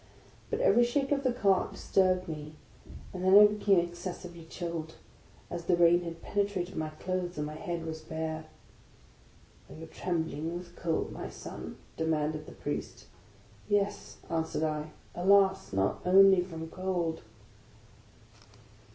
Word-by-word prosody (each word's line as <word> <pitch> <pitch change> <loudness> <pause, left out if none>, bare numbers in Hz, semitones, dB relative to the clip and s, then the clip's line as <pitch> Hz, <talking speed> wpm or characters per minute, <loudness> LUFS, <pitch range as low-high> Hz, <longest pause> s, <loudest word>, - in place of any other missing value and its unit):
But - - -1
every 370 - +5
shake 270 +4 0
of 280 -1 +2
the 260 -2 +2
cart 200 -6 +2
disturbed 185 -1 +2
me; 155 -1 -6 0.6
and 185 -1 -5
then 190 +1 +7
I 210 - +11
be 210 0 0
came 200 -2 +5
excessively 175 -1 -6
chilled, 165 -1 -5 0.6
as 175 -1 -5
the 175 - +3
rain 175 0 +5
had 165 -1 -7
penetrated 200 -3 -1
my 155 0 -2
clothes, 180 +2 -3
and 150 - -1
my 150 - -6
head 170 0 -4
was 160 -1 -5
bare. 160 0 -4 0.6
" - - -28
Are - - -10
you 160 - -8
trembling 165 -1 -3
with 175 0 -11
cold, 165 -2 -1
my - - -6
son? - - -8
" - - -29
demanded 155 -1 -1
the - - -9
Priest. - - -5 0.3
" - - -26
Yes," 205 -1 0
answered 160 -2 -1
I. 155 0 -1
" - - -28
Alas! 195 +1 +4
not 95 0 0
only 190 0 +7
from 165 -3 -6
cold." 175 -3 -2
175 Hz, 155 wpm, -30 LUFS, 160-190 Hz, 0.6 s, I